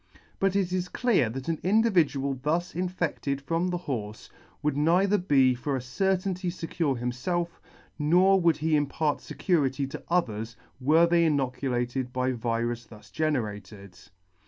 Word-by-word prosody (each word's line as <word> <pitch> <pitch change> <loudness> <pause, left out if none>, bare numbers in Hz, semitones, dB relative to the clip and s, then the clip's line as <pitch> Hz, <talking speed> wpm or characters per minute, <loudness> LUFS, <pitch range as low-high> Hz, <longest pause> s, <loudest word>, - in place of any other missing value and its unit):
But 195 0 +1
it 185 -2 0
is 180 -1 -1
clear 215 - +2
that 130 +3 -6
an 165 -2 -1
individual 175 -10 +2
thus 165 +5 -1
infedted 165 -6 -2
from 165 +5 -1
the 180 -1 -1
horfe, 110 -11 -5 0.3
would 150 -2 +1
neither 180 +7 +3
be 135 -7 +4
for 135 +3 -3
a - - -1
certainty 185 +6 -1
fecure 165 -6 -2
himfelf, 125 +9 -2 0.5
nor 180 +6 +4
would 165 -3 +3
he 155 0 +1
impart 145 +1 0
fecurity 140 -7 0
to - - -6
others, 115 -10 -1 0.2
were 155 +6 +5
they 170 0 +3
inoculated 130 -3 -1
by 130 0 0
virus 120 0 -2
thus 105 -3 -15
generated. 105 -10 -3
150 Hz, 140 wpm, -27 LUFS, 125-175 Hz, 0.5 s, were